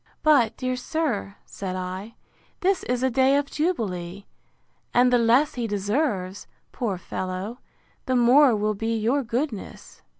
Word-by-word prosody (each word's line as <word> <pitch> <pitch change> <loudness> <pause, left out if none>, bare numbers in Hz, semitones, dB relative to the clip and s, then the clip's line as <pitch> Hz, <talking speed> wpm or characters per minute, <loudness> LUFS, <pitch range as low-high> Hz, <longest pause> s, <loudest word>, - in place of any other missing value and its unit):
But, 245 -8 +4
dear 255 0 -1
sir, 250 -7 -2
said 185 -2 -5
I, 185 +4 -5 0.5
this 380 +1 +2
is 250 0 -1
a 260 - +2
day 265 +3 +4
of 285 - +1
jubilee; 200 - -2 0.7
and 250 0 +5
the 245 - +5
less 250 +7 +3
he 240 -2 -3
deserves, 205 -2 -2 0.2
poor 215 -7 -2
fellow, 185 +6 -5 0.5
the 255 - +1
more 250 +1 +6
will 210 0 0
be 225 +2 -2
your 235 +6 +1
goodness. 240 -2 -5
235 Hz, 140 wpm, -25 LUFS, 200-265 Hz, 0.7 s, more